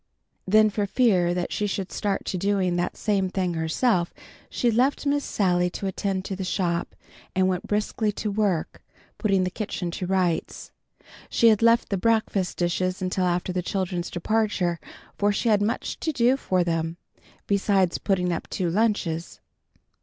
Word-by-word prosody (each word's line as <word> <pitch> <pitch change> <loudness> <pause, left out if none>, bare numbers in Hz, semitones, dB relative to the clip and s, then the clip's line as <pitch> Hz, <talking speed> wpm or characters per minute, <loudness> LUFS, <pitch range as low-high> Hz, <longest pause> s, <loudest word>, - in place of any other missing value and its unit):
Then 215 +2 +5
for 205 0 -1
fear 190 -7 +3
that 180 -1 -2
she 210 - 0
should 195 -1 -3
start 200 -2 -2
to - - -3
doing 190 -2 +1
that 175 0 -2
same 195 -3 0
thing 185 -2 -1
herself, 170 +3 0 0.3
she 240 - +1
left 255 +6 +1
Miss 285 0 +1
Sally 180 -3 +1
to 195 - -6
attend 190 0 -2
to 195 - -3
the 190 - -4
shop, 175 -2 -1 0.4
and 185 0 +3
went 185 +3 -2
briskly 210 +1 0
to 210 +1 -3
work, 200 -6 -1 0.4
putting 195 -4 +2
the 185 - -1
kitchen 190 -4 -4
to 180 +1 -4
rights. 185 -3 -1 0.6
She 230 - +5
had 215 -1 +3
left 230 0 +4
the 195 - 0
breakfast 210 -3 0
dishes 185 +1 0
until 185 0 -1
after 180 +1 0
the 180 - 0
children's 180 -1 -2
departure, 185 -2 0 0.4
for 205 0 +3
she 205 +3 0
had 210 -2 +4
much 210 +3 -2
to 320 - -1
do 250 -2 +3
for 185 -9 0
them, 165 0 -2 0.5
besides 195 -3 +2
putting 180 -3 0
up 165 - -5
two 175 -3 -1
lunches. 185 -5 -1
190 Hz, 170 wpm, -25 LUFS, 180-210 Hz, 0.6 s, Then